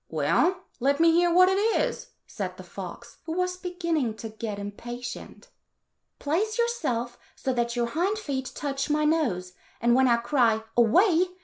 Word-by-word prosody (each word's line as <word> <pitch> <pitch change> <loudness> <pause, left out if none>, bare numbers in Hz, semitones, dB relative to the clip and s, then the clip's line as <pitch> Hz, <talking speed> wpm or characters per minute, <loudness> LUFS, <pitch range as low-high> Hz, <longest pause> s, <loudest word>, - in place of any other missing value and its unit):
"Well, 370 +1 +1 0.2
let 280 +4 +1
me 330 0 +6
hear 345 +1 +3
what 365 +2 +6
it 380 +1 +2
is," 455 +3 0 0.2
said - - -5
the - - -9
fox, - - -9
who 320 - -2
was 365 +1 -1
beginning 340 - -2
to 225 0 -7
get 215 -1 -5
impatient. 240 +4 -7 0.7
"Place 410 +10 -1
yourself 260 - -1 0.2
so 260 - -2
that 235 -1 -1
your 240 -1 +1
hind 350 - -1
feet 275 -10 -4
touch 275 -1 -3
my 300 0 +2
nose, 235 - 0 0.3
and 235 +1 +3
when 260 +1 +4
I 235 -1 +4
cry, 235 -3 +2
' - - -37
Away 340 - +4
285 Hz, 170 wpm, -26 LUFS, 240-360 Hz, 0.7 s, me